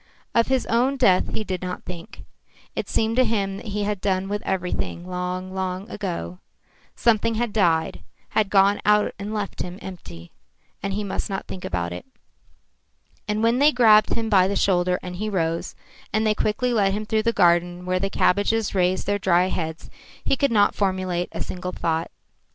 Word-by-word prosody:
Of 230 Hz, -, +3 dB
his 265 Hz, -1 st, +1 dB
own 250 Hz, +4 st, +1 dB
death 190 Hz, -8 st, +3 dB
he 220 Hz, -, -1 dB
did 185 Hz, -3 st, -4 dB
not 180 Hz, 0 st, -5 dB
think. 170 Hz, -2 st, -9 dB, 0.5 s
It -, -, -3 dB
seemed 225 Hz, 0 st, +1 dB
to 255 Hz, -, +6 dB
him 200 Hz, -4 st, -1 dB
that 220 Hz, -, -9 dB
he 205 Hz, 0 st, -2 dB
had 205 Hz, -2 st, -2 dB
done 190 Hz, -1 st, 0 dB
with 205 Hz, 0 st, -2 dB
everything 180 Hz, -1 st, -2 dB
long, 180 Hz, +1 st, -4 dB
long 190 Hz, +1 st, -3 dB
ago. 170 Hz, -, -4 dB, 0.6 s
Something 230 Hz, 0 st, +2 dB
had 230 Hz, -1 st, -1 dB
died, 165 Hz, -6 st, +1 dB, 0.3 s
had 215 Hz, -3 st, +1 dB
gone 200 Hz, +1 st, +4 dB
out 210 Hz, 0 st, +3 dB
and 200 Hz, +1 st, -5 dB
left 210 Hz, -2 st, -3 dB
him 180 Hz, 0 st, -5 dB
empty, 85 Hz, -, -10 dB, 0.5 s
and 195 Hz, 0 st, -2 dB
he 210 Hz, +1 st, -2 dB
must 200 Hz, +2 st, -3 dB
not 195 Hz, -1 st, -3 dB
think 185 Hz, -, -8 dB
about 85 Hz, -1 st, -2 dB
it. 90 Hz, -, -8 dB, 1.2 s
And 210 Hz, +1 st, -1 dB
when 230 Hz, +2 st, +3 dB
they 295 Hz, +2 st, +6 dB
grabbed 220 Hz, -5 st, +5 dB
him 225 Hz, -1 st, -2 dB
by 190 Hz, -4 st, +4 dB
the 200 Hz, -, -1 dB
shoulder 180 Hz, -2 st, +2 dB
and 180 Hz, -1 st, -6 dB
he 215 Hz, +3 st, -2 dB
rose, 165 Hz, -4 st, -2 dB, 0.4 s
and 215 Hz, +1 st, +1 dB
they 215 Hz, -, +3 dB
quickly 240 Hz, +4 st, 0 dB
led 200 Hz, -4 st, +2 dB
him 215 Hz, +1 st, -3 dB
through 220 Hz, +1 st, +1 dB
the 230 Hz, +1 st, +1 dB
garden 175 Hz, -2 st, +2 dB
where 185 Hz, 0 st, 0 dB
the 195 Hz, +1 st, -1 dB
cabbages 205 Hz, +3 st, +1 dB
raised 185 Hz, -1 st, +1 dB
their 205 Hz, 0 st, 0 dB
dry 185 Hz, -1 st, +3 dB
heads, 160 Hz, -3 st, -4 dB, 0.4 s
he -, -, +3 dB
could 280 Hz, -1 st, +1 dB
not 205 Hz, -2 st, +4 dB
formulate 185 Hz, -3 st, -1 dB
a -, -, -4 dB
single 180 Hz, 0 st, -5 dB
thought. 165 Hz, -1 st, -1 dB
195 Hz, 190 wpm, -23 LUFS, 180-215 Hz, 1.2 s, to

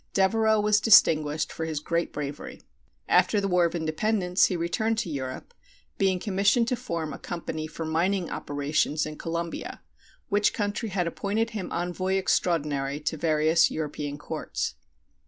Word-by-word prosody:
Devereux 220 Hz, +3 st, +3 dB
was 210 Hz, 0 st, +3 dB
distinguished 155 Hz, -8 st, +5 dB
for 160 Hz, -, -3 dB
his 160 Hz, -2 st, -2 dB
great 170 Hz, +3 st, -1 dB
bravery. 150 Hz, -, -6 dB, 0.4 s
After 210 Hz, -, +4 dB
the 195 Hz, -, -1 dB
War 180 Hz, -2 st, +3 dB
of 170 Hz, +1 st, -2 dB
Independence 180 Hz, +3 st, +1 dB
he 185 Hz, -, -1 dB
returned 195 Hz, +7 st, 0 dB
to 200 Hz, -7 st, -2 dB
Europe, 130 Hz, -, -5 dB, 0.5 s
being 190 Hz, -2 st, +2 dB
commissioned 200 Hz, +5 st, +2 dB
to 250 Hz, -, +1 dB
form 170 Hz, -, -4 dB
a -, -, -8 dB
company 160 Hz, -2 st, -5 dB
for 160 Hz, +1 st, -6 dB
mining 175 Hz, +3 st, 0 dB
operations 145 Hz, +1 st, -1 dB
in 155 Hz, 0 st, -6 dB
Colombia, 170 Hz, +1 st, -5 dB, 0.4 s
which 205 Hz, -2 st, +2 dB
country 205 Hz, +2 st, -2 dB
had 185 Hz, -2 st, -1 dB
appointed 210 Hz, +6 st, -1 dB
him 210 Hz, -5 st, -5 dB
envoy 180 Hz, +2 st, -1 dB
extraordinary 150 Hz, -7 st, 0 dB
to 155 Hz, -, -2 dB
various 160 Hz, +1 st, +3 dB
European 145 Hz, -2 st, -4 dB
courts. 145 Hz, -, -4 dB
170 Hz, 150 wpm, -26 LUFS, 155-205 Hz, 0.5 s, distinguished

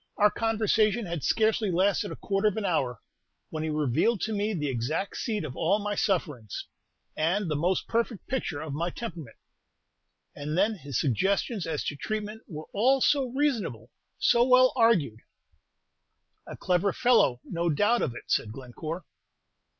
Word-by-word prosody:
Our 210 Hz, 0 st, +5 dB
conversation 220 Hz, 0 st, +1 dB
had 170 Hz, -5 st, -4 dB
scarcely 220 Hz, +2 st, +2 dB
lasted 190 Hz, +2 st, +1 dB
a -, -, -5 dB
quarter 195 Hz, +1 st, 0 dB
of 210 Hz, -, 0 dB
an 215 Hz, -, -2 dB
hour, 130 Hz, -, 0 dB, 0.5 s
when 155 Hz, -, -3 dB
he 160 Hz, -, -2 dB
revealed 155 Hz, -, +1 dB
to 220 Hz, -, -1 dB
me 205 Hz, +1 st, 0 dB
the 150 Hz, -3 st, -2 dB
exact 135 Hz, -, -2 dB
seat 215 Hz, -6 st, -2 dB
of 140 Hz, -4 st, -6 dB
all 185 Hz, +9 st, +2 dB
my 205 Hz, 0 st, -3 dB
sufferings, 150 Hz, -, -2 dB, 0.5 s
and 175 Hz, +3 st, 0 dB
the -, -, +1 dB
most 175 Hz, +6 st, 0 dB
perfect 230 Hz, -2 st, -1 dB
picture 185 Hz, -, -3 dB
of 155 Hz, -3 st, -5 dB
my 170 Hz, +4 st, -1 dB
temperament. 170 Hz, -, -7 dB, 1.0 s
And 150 Hz, +3 st, -4 dB
then 205 Hz, +4 st, +3 dB
his 145 Hz, -, -4 dB
suggestions 195 Hz, -, 0 dB
as 155 Hz, -3 st, -2 dB
to 145 Hz, -, -3 dB
treatment 215 Hz, +6 st, -4 dB
were 155 Hz, -4 st, -7 dB
all 260 Hz, +6 st, +3 dB
so 275 Hz, +1 st, +3 dB
reasonable, 230 Hz, -, -1 dB, 0.3 s
so 235 Hz, -, +4 dB
well 255 Hz, 0 st, +5 dB
argued." 220 Hz, -, +3 dB, 1.3 s
"A -, -, -8 dB
clever 180 Hz, +2 st, +1 dB
fellow, 235 Hz, -, +3 dB
no 170 Hz, 0 st, -2 dB
doubt 205 Hz, +10 st, +2 dB
of 120 Hz, -, -1 dB
it," -, -, -8 dB
said 105 Hz, -, 0 dB
Glencore. 150 Hz, +8 st, -7 dB
190 Hz, 160 wpm, -28 LUFS, 150-220 Hz, 1.3 s, Our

